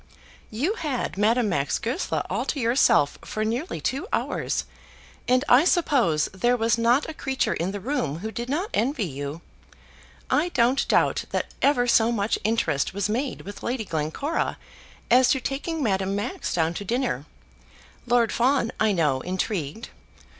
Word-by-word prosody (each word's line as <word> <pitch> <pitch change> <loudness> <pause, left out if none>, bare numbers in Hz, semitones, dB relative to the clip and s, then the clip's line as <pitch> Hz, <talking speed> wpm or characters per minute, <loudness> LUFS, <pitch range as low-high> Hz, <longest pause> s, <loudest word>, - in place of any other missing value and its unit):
"You 275 - -1
had 295 - -3
Madame 220 +3 +2
Max 140 -7 0
Goesler 255 +11 -2
all - - -1
to 290 - -2
yourself 230 - +3
for 215 0 -3
nearly 240 +10 -2
two 275 +9 -2
hours, - - -1 0.6
and 255 +2 +3
I 250 +4 +6
suppose 275 - +2
there 240 +6 +2
was 230 0 +2
not 235 +5 +2
a - - -5
creature 265 -3 -1
in 170 +3 -2
the 205 - -5
room 190 - -2
who 220 +6 -5
did 240 +2 -5
not 355 - -1
envy 250 -2 0
you. 145 +1 -6 0.9
I 325 +4 +2
don't 255 -3 +2
doubt - - +2
that - - -3
ever 275 -3 +3
so 235 -1 +4
much 210 -2 0
interest 215 -8 0
was 200 0 -1
made 250 +5 -2
with 205 +1 -9
Lady 240 -2 -2
Glencora 160 - -2 0.5
as 250 +1 +6
to 265 - +3
taking 290 +5 -3
Madame 195 -3 0
Max 285 - -3
down 165 -1 +1
to 205 - -5
dinner. 245 +5 -1 0.8
Lord 240 -2 +3
Fawn, 250 -1 +2
I 215 -1 +3
know, 150 -7 +1
intrigued." 185 - -3
230 Hz, 160 wpm, -25 LUFS, 195-265 Hz, 0.9 s, I